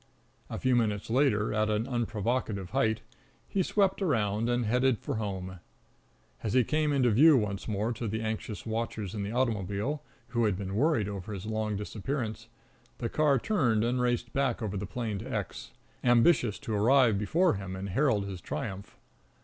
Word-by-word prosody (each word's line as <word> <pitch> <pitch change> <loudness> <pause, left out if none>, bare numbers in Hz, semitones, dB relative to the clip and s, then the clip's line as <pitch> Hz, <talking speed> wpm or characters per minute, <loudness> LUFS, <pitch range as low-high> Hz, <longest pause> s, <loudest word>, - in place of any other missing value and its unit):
A 115 - -4
few 130 +3 +2
minutes 110 -3 0
later, 115 -5 +2
at 110 0 +1
an 105 +1 0
unprovocative 115 -5 -2
height, 110 0 +1 0.5
he 195 - 0
swept 195 +1 +1
around 115 - +1
and 120 -1 +1
headed 125 +2 +2
for - - -4
home. 95 -4 -4 0.8
As 110 - -2
he 130 -1 +5
came 150 +4 +1
into 130 -4 +3
view 145 +6 +7
once 100 -4 -2
more 110 +2 -1
to 115 +1 -4
the 110 +2 -2
anxious 110 -1 -4
watchers 110 -3 -3
in 105 - -3
the 100 +1 -3
automobile, 115 +2 -1 0.3
who 120 -1 +1
had 100 -4 +1
been 95 -1 -4
worried 120 -2 +2
over 100 0 -5
his 95 0 -6
long 110 -1 -1
disappearance, 110 +2 -4 0.5
the 115 - -3
car 150 -3 +3
turned 120 - +1
and 125 +2 +1
raced 120 -1 0
back 135 -4 +1
over 105 -2 -3
the 100 0 -3
plain 110 -3 -3
to 125 +5 -7
X, 105 -5 -4 0.3
ambitious 120 -2 +4
to 110 - -5
arrive 115 0 +4
before 165 - +2
him 95 -2 -5
and 95 +1 -5
herald 110 -1 +2
his 95 -3 -6
triumph. 95 +5 -5
110 Hz, 175 wpm, -29 LUFS, 105-125 Hz, 0.8 s, view